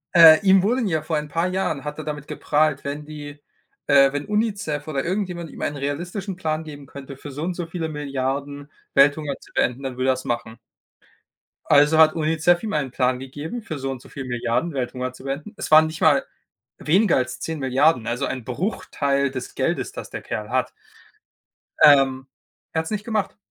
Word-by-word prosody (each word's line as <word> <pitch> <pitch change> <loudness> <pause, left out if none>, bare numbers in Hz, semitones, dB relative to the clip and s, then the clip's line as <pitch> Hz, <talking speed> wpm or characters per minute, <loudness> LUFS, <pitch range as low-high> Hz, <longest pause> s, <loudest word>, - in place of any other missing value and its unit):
äh, 165 +1 +9
ihm 190 0 +6
wurden 230 +4 +1
ja 160 -4 0
vor 155 +1 -3
ein 150 0 -4
paar 165 +4 0
Jahren 180 -6 -2
hat 150 +1 -5
er 155 - -5
damit 150 -1 -5
geprahlt, 150 -1 0
wenn 145 +1 -5
die 145 -1 -9 0.5
äh, 140 -1 +6
wenn 145 0 -3
Unicef 205 -9 -1
oder 140 -3 -2
irgendjemand 180 -3 -3
ihm - - -11
einen 145 - -2
realistischen 175 +8 -4
Plan 160 -3 -2
geben 145 -2 -10
könnte, 135 0 -10
für 145 - -9
so 145 +3 -5
und 180 +2 -1
so 175 - -4
viele 165 0 -4
Milliarden 140 0 -4 0.2
Welthunger 145 +1 +4
zu - - -18
beenden, 125 +3 0
dann 130 -2 -5
würde 130 +1 +1
er - - +5
das 130 - -7
machen. 120 -1 -3 1.1
Also, 145 +2 +5
hat 160 -1 +7
Unicef 165 +3 +2
ihm 215 - -3
einen 140 -4 -1
Plan 125 0 +1
gegeben, 145 - -6
für 170 -9 -6
so 135 0 -3
und 130 -2 -7
so - - -16
viele 135 - -7
Milliarden 125 +6 -1
Welthunger 130 -1 -3
zu 130 - -14
beenden. 140 +9 -5
Es - - -5
waren 155 0 +8
nicht 155 0 -7
mal - - +5 0.6
weniger 185 +5 +3
als 130 0 -2
10.000.000.000, 140 -4 +1
also 120 +4 -1
ein 130 -3 -4
Bruchteil 140 - -1
des 130 -1 -6
Geldes, - - -1
das - - -8
der - - -6
Kerl 105 -1 -5
hat. 130 +1 0 1.1
Ähm, 135 -2 +5 0.5
er 160 - +1
hat's 160 +4 -4
nicht 210 -1 -3
gemacht. 220 -3 -2
150 Hz, 195 wpm, -23 LUFS, 135-165 Hz, 1.1 s, äh